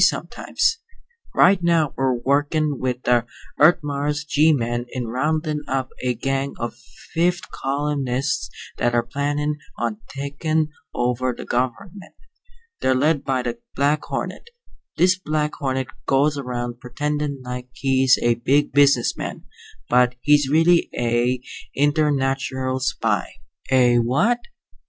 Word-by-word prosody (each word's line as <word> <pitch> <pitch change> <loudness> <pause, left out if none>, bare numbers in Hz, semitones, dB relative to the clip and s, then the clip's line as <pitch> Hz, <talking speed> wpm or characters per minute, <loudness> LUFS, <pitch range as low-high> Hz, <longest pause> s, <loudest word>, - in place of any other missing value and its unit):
sometimes. 455 - +1 0.6
Right 190 -1 +5
now 170 -4 +2
we're 130 -1 +1
workin' 145 +3 0
with 125 -1 -2
the 120 -1 +2 0.3
Earth 165 +3 +6
Mars 145 +1 -2
G 155 +2 +4
men 120 -3 -1
in 125 -1 -4
roundin' 150 +4 -1
up 130 -1 -1
a 125 -1 0
gang 135 +3 -2
of 120 0 -4 0.4
fifth 175 +1 0
columnists 140 -1 -1 0.3
that 120 0 +1
are 120 - +3
plannin' 145 +3 -2 0.2
on 115 -3 -2
takin' 145 +3 -1 0.3
over 125 +1 0
the - - -7
gov'ment. 170 +11 -3 0.7
They're 130 - +2
led 145 +2 +2
by 130 -2 0
the 120 -1 -4 0.2
Black 145 +2 +1
Hornet. 470 - -5 0.5
This 180 +1 +4
Black 150 -3 -1
Hornet 130 -1 -2 0.2
goes 140 +2 +3
around 120 -3 -4
pretendin' 145 +2 -3
like 125 0 -6
he's 130 -1 +3
a 120 - +4
big 145 +3 +2
business 140 -4 +4
man, - - -6 0.4
but 125 0 +3
he's 145 -1 +4
really 165 +3 +4
a 120 +1 +1 0.3
internatural 135 -3 +1
spy." 115 -5 -1 0.4
"A 125 -2 +5
what?" 140 - +2
135 Hz, 130 wpm, -22 LUFS, 125-150 Hz, 0.7 s, Earth